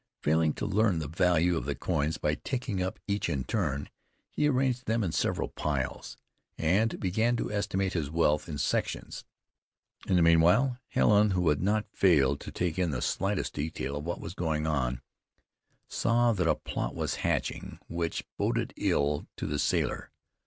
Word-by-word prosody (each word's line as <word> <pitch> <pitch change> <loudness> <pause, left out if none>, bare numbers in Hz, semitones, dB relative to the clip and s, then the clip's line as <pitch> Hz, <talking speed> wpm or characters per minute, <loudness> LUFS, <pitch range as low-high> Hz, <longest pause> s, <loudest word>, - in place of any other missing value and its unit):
Failing 80 0 +3
to - - -4
learn 105 -2 +2
the 80 -2 -3
value 90 +2 +2
of 75 - -3
the 70 0 -2
coins 75 +2 -1
by 75 - 0
taking 120 - -3
up 95 +1 -2
each 100 -3 -1
in 70 -5 -1
turn, 70 +3 -1 0.4
he 150 - +1
arranged 130 -2 0
them 115 0 +1
in 90 - -1
several - - 0
piles, 70 -4 -3 0.4
and 100 +8 +1
began 110 +6 +1
to - - -3
estimate 100 -2 -1
his 80 -5 -1
wealth 75 0 +1
in 75 - -4
sections. 70 - -2 0.8
In 95 - +2
the 90 - +5
meanwhile 90 +11 +4
Helen, 105 0 +4
who 90 -3 +1
had 75 -1 +1
not 105 +3 +1
failed 70 -7 +4
to - - -8
take 90 -1 -2
in 90 -2 +2
the 70 -4 -2
slightest 100 +9 -1
detail 70 -2 -3
of 75 - -5
what 85 +2 -3
was - - -7
going 80 -4 -1
on, 65 -5 -1 0.8
saw 120 +1 +2
that 90 -5 0
a - - +4
plot - - -4
was - - -2
hatching - - -2
which 85 -1 -2 0.2
boded - - 0
ill 75 +1 +1
to - - -4
the 75 -1 -2
sailor. - - 0
85 Hz, 175 wpm, -29 LUFS, 75-105 Hz, 0.8 s, the